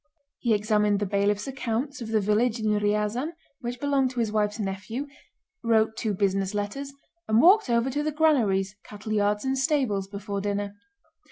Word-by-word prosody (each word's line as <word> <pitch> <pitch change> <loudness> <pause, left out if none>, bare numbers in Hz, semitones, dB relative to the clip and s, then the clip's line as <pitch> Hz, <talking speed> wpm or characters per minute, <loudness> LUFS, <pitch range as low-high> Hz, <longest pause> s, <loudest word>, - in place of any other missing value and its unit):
He 230 -3 +2
examined 210 -1 +2
the 205 - 0
bailiff's 200 +1 +1
accounts 265 +1 -3
of 230 - -5
the 220 -1 +2
village 215 +3 +1
in 220 - -3
Ryazán 210 +7 0 0.3
which 245 0 -5
belonged 275 -2 +2
to 250 -1 -5
his 225 -2 0
wife's 210 -1 0
nephew, 210 +6 -4 0.6
wrote 220 -1 +2
two 215 -2 -2
business 195 0 0
letters, 210 +8 -3 0.4
and 220 +1 +4
walked 370 - +6
over 235 +2 +2
to 290 +3 -1
the 305 +1 -1
granaries, 225 -11 +2
cattle 215 +1 -6
yards 210 +2 +1
and 265 0 +1
stables 260 - +1
before 200 0 -5
dinner. 205 0 -2
215 Hz, 170 wpm, -26 LUFS, 205-255 Hz, 0.6 s, walked